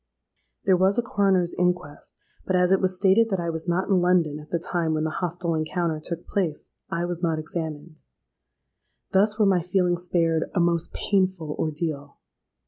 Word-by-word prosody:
"There 190 - +5
was 190 +4 +2
a 240 - +2
coroner's 195 -5 +1
inquest; 180 -4 -2 0.3
but, 185 - +1
as 180 0 +3
it 195 - +4
was 185 -1 +1
stated 200 +4 +4
that 190 -3 -1
I 170 -1 -2
was 160 +1 -6
not 175 +2 0
in 190 -3 +3
London 175 -4 +2
at 150 - -13
the 170 - 0
time 165 -1 -1
when 155 - -1
the 160 - -1
hostile 175 -1 -2
encounter 160 0 -1
took 170 0 -4
place, 175 -7 -2 0.2
I 170 +1 -1
was 175 -1 -4
not 165 -3 0
examined. 155 0 -6 1.1
Thus 210 +2 +3
were 215 - +4
my 190 -3 +3
feelings 180 0 0
spared 165 -2 +1
a - - +2
most 170 -1 +1
painful 185 -6 0
ordeal! 150 -2 -3
175 Hz, 180 wpm, -25 LUFS, 160-185 Hz, 1.1 s, There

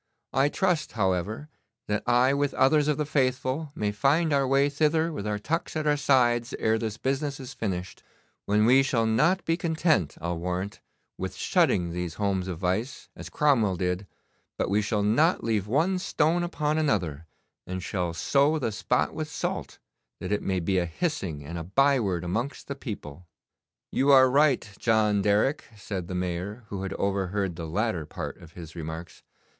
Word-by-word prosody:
I 135 +2 +3
trust, 175 -3 0
however, 100 - -1 0.4
that 105 0 0
I 125 +2 +4
with 140 0 0
others 145 +2 +4
of 150 - +1
the 150 - -1
faithful 135 +1 0
may 105 -1 -1
find 145 +9 +2
our 140 -1 +2
way 135 +2 +3
thither 155 +3 +1
with 105 -8 -4
our 105 0 -1
tucks 160 +12 -3
at 155 -1 -1
our 150 -1 +3
sides 125 -4 +2
ere 110 0 +1
this 110 -2 -3
business 135 +1 -2
is 135 0 -8
finished, 90 -4 -4 0.5
when 105 +1 +3
we 130 +3 +6
shall 120 -4 +1
not 150 +12 +2
be 165 - +2
content, 160 - +1
I'll 85 0 -3
warrant, 90 +3 -4 0.4
with - - -4
shutting 85 -2 +2
these 90 -1 -4
homes 95 -3 -1
of 90 -3 -4
vice, 95 +9 -2
as - - -9
Cromwell 120 -10 +2
did, 90 +2 -2 0.5
but - - -1
we 105 +1 +3
shall 105 0 0
not 150 - +3
leave 110 -3 0
one 165 - +1
stone 165 -1 +1
upon 155 -3 -1
another, 85 - -1 0.4
and 90 0 -4
shall 90 -4 -2
sow 140 - +2
the 125 -7 -1
spot 100 - 0
with - - -4
salt, - - -4 0.4
that 90 - -5
it 105 - +1
may 95 -1 -1
be 95 +2 +1
a 90 - 0
hissing 85 - -3
and 85 +3 -5
a - - -5
byword 105 - +2
amongst 115 +10 -3
the 140 - -4
people.' 90 - -8 0.6
'You 140 +2 +3
are 130 -1 +7
right, 140 -3 +3
John 110 -3 +2
Derrick,' 105 +9 +2
said 95 -3 -5
the 90 - -5
Mayor, 90 +5 -3
who 100 -2 -4
had 95 0 -4
overheard 100 -1 -1
the 80 -1 -6
latter 95 -4 -1
part - - -6
of 85 -1 -15
his 80 -2 -10
remarks. 80 +1 -7
110 Hz, 180 wpm, -27 LUFS, 95-140 Hz, 0.6 s, are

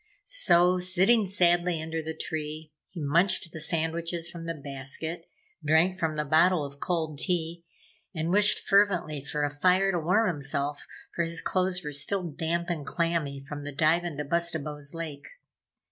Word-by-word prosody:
So, 185 - +4
sitting 190 +4 +3
sadly 175 -2 +2
under 160 +1 -4
the 160 0 -6
tree, 155 0 -5 0.2
he 175 - -9
munched 170 +4 +1
the 160 - -7
sandwiches 165 +1 -1
from 170 -2 -8
the 165 0 -3
basket, 140 +4 -6 0.3
drank 160 +5 +3
from 160 -2 -1
the 150 0 -2
bottle 160 +2 +3
of 140 0 -11
cold 160 -4 -2
tea 170 -1 -1 0.5
and 160 0 -2
wished 205 +2 +5
fervently 180 -8 +2
for 150 +1 -3
a 145 - 0
fire 185 +5 +3
to 175 - 0
warm 185 +8 +2
himself, 145 -2 -2 0.3
for - - 0
his 165 0 -2
clothes 185 -1 0
were 150 -1 -5
still 185 +7 0
damp 170 +1 -2
and 170 -4 -3
clammy 150 -4 -2
from 145 0 -6
the 145 - -5
dive 160 +4 +3
in 170 -5 -5
Bustabo's 155 -3 -1
lake. 155 -4 -6
165 Hz, 160 wpm, -27 LUFS, 150-180 Hz, 0.5 s, wished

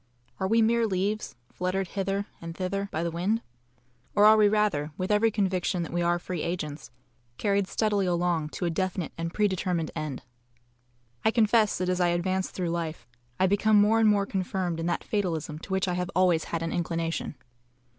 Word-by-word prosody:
Are 190 - 0
we 225 +2 +4
mere 230 +1 +3
leaves, 205 +2 -2 0.2
fluttered 185 0 -2
hither 195 0 -2 0.2
and 165 0 -7
thither 195 +2 -2
by 160 - -2
the 170 - -1
wind, 195 +7 0 0.7
or 205 - +6
are 215 +1 +8
we 215 -1 +5
rather, 205 -9 +1
with 185 +2 -2
every 210 +2 +4
conviction 190 -3 0
that 165 - -7
we 175 - 0
are 175 0 +2
free 175 -1 -5
agents, 150 -8 -4 0.5
carried 200 -2 +1
steadily 205 -3 +1
along 175 -3 0
to 180 - -3
a 170 - 0
definite 185 0 -2
and 165 0 -4
pre 210 +4 +2
determined 180 -4 -1
end? 155 -5 -4 1.0
I - - +4
confess 220 -2 +3
that 185 - -1
as 180 0 0
I 175 - +4
advance 185 +2 0
through 180 -2 -3
life, 165 -6 -3 0.3
I 185 - +4
become 205 +2 +4
more 215 +2 +4
and 220 -1 +5
more 200 -1 +3
confirmed 185 -3 -2
in 165 - -2
that 175 - -1
fatalism 165 -7 -2
to 190 - -10
which 190 0 +1
I 180 - 0
have 180 0 -2
always 180 -3 +3
had 165 -1 -3
an 165 - -2
inclination. 165 -2 -2
185 Hz, 195 wpm, -27 LUFS, 170-205 Hz, 1.0 s, are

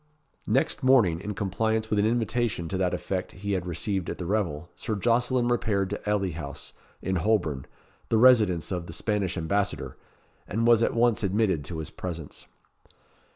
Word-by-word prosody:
Next 135 +9 +1
morning, 120 - +4
in 105 0 -5
compliance 110 +3 -1
with 105 - +2
an 105 - +3
invitation 115 -5 0
to 95 - -2
that 90 -2 +1
effect 95 -1 -4
he 100 +2 -5
had 90 -2 -1
received 90 +2 -2
at - - -4
the 90 - -5
revel, 85 -5 -1
Sir 110 - -3
Jocelyn 120 +3 +2
repaired 105 -5 0
to 105 - -3
Ely 100 -3 +1
House, 75 -3 -7 0.3
in 95 -1 0
Holborn, 85 -8 0 0.4
the 115 - +3
residence 110 -9 +5
of 90 -2 -3
the - - -7
Spanish 105 -5 -1
Ambassador, 100 +5 -1 0.5
and 115 +4 -1
was 120 -1 +5
at 115 - +1
once 115 -1 +3
admitted 95 -5 +1
to 80 - -5
his 80 - -5
presence. 85 -4 -7
100 Hz, 170 wpm, -27 LUFS, 90-110 Hz, 0.5 s, residence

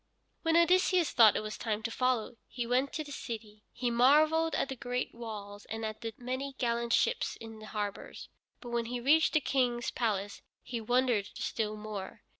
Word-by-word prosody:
When 325 0 +3
Odysseus 360 0 +4
thought 225 -4 +7
it - - -1
was 215 0 -6
time 220 -1 -2
to 230 - -2
follow, 245 -2 0
he 240 0 -4
went 255 +3 +1
to 310 - -2
the 290 - -11
city. 220 -6 -7
He 245 -1 -2
marveled 305 +6 +4
at - - 0
the 265 - -3
great 245 0 -3
walls 205 -3 -8
and 225 0 -4
at 215 +1 -5
the 225 -1 -3
many 260 +2 -4
gallant 235 -1 0
ships 475 - +2
in 225 -1 -10
the 215 - -10
harbors. 205 -2 -5 0.3
But 240 - -8
when 235 -1 0
he 245 +1 -3
reached 300 +6 +4
the 310 - +5
King's 245 -4 0
palace, 205 -4 -2 0.2
he 235 -2 -4
wondered 240 -3 +1
still 215 -2 -2
more. 210 -2 -7
240 Hz, 190 wpm, -31 LUFS, 220-265 Hz, 0.3 s, thought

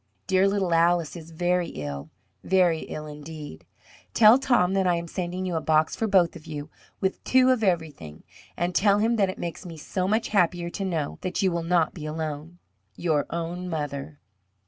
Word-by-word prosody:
Dear 190 +1 +3
little 195 -3 0
Alice 170 -2 +2
is 165 -1 -9
very 175 +1 0
ill, 70 - -6 0.3
very 180 -4 +3
ill 155 - -6
indeed. 150 - -9 0.5
Tell 225 +3 +7
Tom 240 -9 +2
that 190 -1 +2
I 175 - +3
am 170 0 -4
sending 180 +2 -4
you 180 -2 -2
a 160 - 0
box 155 0 +2
for 225 - -1
both 185 -5 +3
of 165 -1 -12
you, 150 -1 -6 0.3
with 190 -1 -2
two 260 0 +4
of 245 -3 +1
everything. 155 - -2 0.3
And 175 +1 -1
tell 200 +2 +4
him 225 +3 +2
that 195 -3 +2
it 185 - -5
makes 170 +2 -5
me 170 -3 -9
so 185 +4 -2
much 220 +3 0
happier 175 -3 +1
to 195 - -4
know 165 -6 -2
that 185 +2 -2
you 190 - +3
will 170 0 -1
not 165 -1 +1
be 155 -3 -7
alone. 155 +1 -5 0.4
Your 155 -4 0
own 170 +2 -4
mother. 145 -2 -4
175 Hz, 190 wpm, -26 LUFS, 155-185 Hz, 0.5 s, Tell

